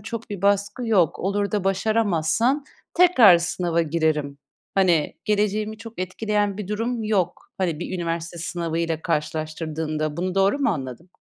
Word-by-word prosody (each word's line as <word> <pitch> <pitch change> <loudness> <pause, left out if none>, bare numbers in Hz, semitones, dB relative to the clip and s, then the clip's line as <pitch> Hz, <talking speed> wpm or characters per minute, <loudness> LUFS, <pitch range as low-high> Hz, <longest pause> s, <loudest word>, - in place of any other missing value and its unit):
çok 225 +2 -7
bir 200 -3 -6
baskı 205 +4 +1
yok. 185 -8 +2
Olur 200 +2 -1
da 205 -3 0
başaramazsan, 215 - +1 0.3
"Tekrar 255 - +7
sınava 170 0 0
girerim. 155 -3 -1 0.4
Hani, 175 -6 +2
geleceğimi 210 +1 0
çok 225 -2 -11
etkileyen 205 +2 -1
bir 200 - -5
durum 225 +2 -2
yok." 195 -5 -1
Hani, 170 -5 -1
bir 185 - -4
üniversite 170 0 -3
sınavıyla 165 -1 -2
karşılaştırdığında, 155 -1 -2
bunu 180 +2 -2
doğru 195 +8 +3
mu 280 - +2
anladım? 140 +2 -6
185 Hz, 140 wpm, -23 LUFS, 165-210 Hz, 0.4 s, Tekrar